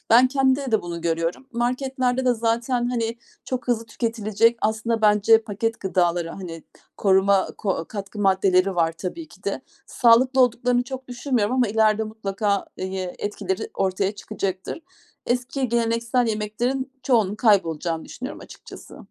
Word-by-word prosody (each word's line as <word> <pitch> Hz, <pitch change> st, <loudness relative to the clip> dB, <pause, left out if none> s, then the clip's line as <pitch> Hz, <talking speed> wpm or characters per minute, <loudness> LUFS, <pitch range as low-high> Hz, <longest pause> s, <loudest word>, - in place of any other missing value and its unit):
Ben 240 Hz, +3 st, +7 dB
kendimde 265 Hz, -1 st, +1 dB
de 220 Hz, -, +3 dB
bunu 170 Hz, -1 st, -5 dB
görüyorum. 165 Hz, +8 st, -2 dB
Marketlerde 255 Hz, +1 st, 0 dB
de 250 Hz, -, +3 dB
zaten, 235 Hz, +2 st, 0 dB
hani, 230 Hz, -1 st, -1 dB, 0.3 s
çok 255 Hz, -1 st, -4 dB
hızlı 230 Hz, -2 st, +1 dB
tüketilecek, 230 Hz, 0 st, +1 dB
aslında 220 Hz, +1 st, 0 dB
bence 210 Hz, +1 st, +5 dB
paket 225 Hz, +2 st, -3 dB
gıdaları, 175 Hz, -3 st, 0 dB
hani 165 Hz, -4 st, -8 dB, 0.3 s
koruma 195 Hz, 0 st, +3 dB
ko 190 Hz, -5 st, -1 dB
katkı 200 Hz, 0 st, -7 dB
maddeleri 190 Hz, -1 st, +3 dB
var 165 Hz, -1 st, +2 dB
tabii 190 Hz, -, -6 dB
ki -, -, -19 dB
de. -, -, -2 dB, 0.3 s
Sağlıklı 255 Hz, +2 st, +4 dB
olduklarını 245 Hz, 0 st, +3 dB
çok 260 Hz, 0 st, -8 dB
düşünmüyorum 245 Hz, -3 st, 0 dB
ama 250 Hz, -3 st, +2 dB
ileride 220 Hz, 0 st, +2 dB
mutlaka, 205 Hz, -2 st, -2 dB
eye 185 Hz, -1 st, -4 dB
etkileri 195 Hz, -2 st, -3 dB
ortaya 190 Hz, +1 st, 0 dB
çıkacaktır. 195 Hz, -, -4 dB, 0.5 s
Eski 250 Hz, +2 st, -1 dB
geleneksel 235 Hz, +1 st, +1 dB
yemeklerin 240 Hz, +5 st, -2 dB
çoğunun 225 Hz, -6 st, +2 dB
kaybolacağını 170 Hz, -, +1 dB
düşünüyorum 260 Hz, +4 st, -7 dB
açıkçası. -, -, -12 dB
220 Hz, 135 wpm, -23 LUFS, 195-245 Hz, 0.5 s, Ben